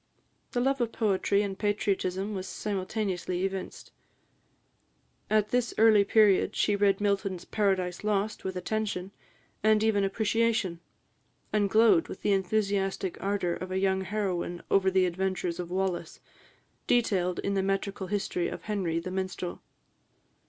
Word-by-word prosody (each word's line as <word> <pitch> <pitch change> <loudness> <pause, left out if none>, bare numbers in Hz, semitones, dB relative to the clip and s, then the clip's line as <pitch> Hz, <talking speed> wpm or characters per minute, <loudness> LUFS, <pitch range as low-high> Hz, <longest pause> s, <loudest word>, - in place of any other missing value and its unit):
The 245 - +1
love 270 +1 +1
of 235 -1 0
poetry 200 -2 +1
and 195 -1 -3
patriotism 200 -1 -1
was 190 -1 -4
simultaneously 190 -2 -2
evinced. 195 -1 -5 1.4
At 215 -1 +2
this 245 0 0
early 215 -2 +6
period, 200 -1 +4
she 205 - +2
read 200 -1 +2
Milton's 195 -3 -1
"Paradise 190 -4 0
Lost" 210 0 -1
with 190 0 -4
attention, 195 0 -2 0.5
and 215 0 +4
even 215 -2 +2
appreciation; 220 -2 0 0.7
and 205 -2 +2
glowed 215 -5 +5
with - - -9
the 205 - +3
enthusiastic 195 -1 0
ardour 195 -3 0
of 185 - -6
a 185 - -2
young 190 0 +1
heroine 190 -3 -2
over 190 -1 +4
the 190 0 +3
adventures 180 -1 -2
of 175 -1 -4
Wallace, 185 -2 -2 0.7
detailed 190 -7 +2
in 200 - -1
the 195 - +1
metrical 195 0 -2
history 190 -3 -1
of 175 0 -7
Henry, 190 -6 -1
the 185 +2 -6
Minstrel. 185 -1 -4
195 Hz, 140 wpm, -28 LUFS, 185-210 Hz, 1.4 s, early